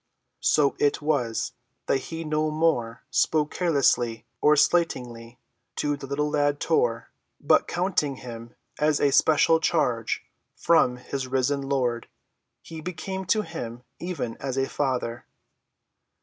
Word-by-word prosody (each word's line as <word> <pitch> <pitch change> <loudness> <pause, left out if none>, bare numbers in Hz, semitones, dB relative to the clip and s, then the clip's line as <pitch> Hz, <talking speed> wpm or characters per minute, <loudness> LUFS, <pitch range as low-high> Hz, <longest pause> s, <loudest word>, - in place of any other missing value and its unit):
So 145 -2 +3
it 145 -1 +2
was 140 -7 -1 0.3
that - - +2
he 165 0 -5
no 155 0 0
more 155 -8 0
spoke 150 -2 +2
carelessly 130 -9 +1 0.2
or 150 0 +5
slightingly 125 -7 0 0.4
to 145 0 0
the 135 -1 -9
little 145 +2 -1
lad, 145 -1 +1
Tor, 120 -8 0 0.3
but, - - +3
counting 175 -6 0
him 115 -2 -9 0.2
as 150 -1 +2
a 145 - +3
special 160 +3 +4
charge 125 -9 0 0.3
from 130 -7 +3
his 130 +1 -5
risen 135 +2 0
Lord, 130 -4 -1 0.6
he 160 -1 -8
became 185 +3 -5
to 215 +4 +2
him 120 - -7 0.2
even 170 -10 -4
as 135 -1 -4
a 135 0 +1
father. 125 -4 -2
140 Hz, 130 wpm, -25 LUFS, 125-155 Hz, 0.6 s, or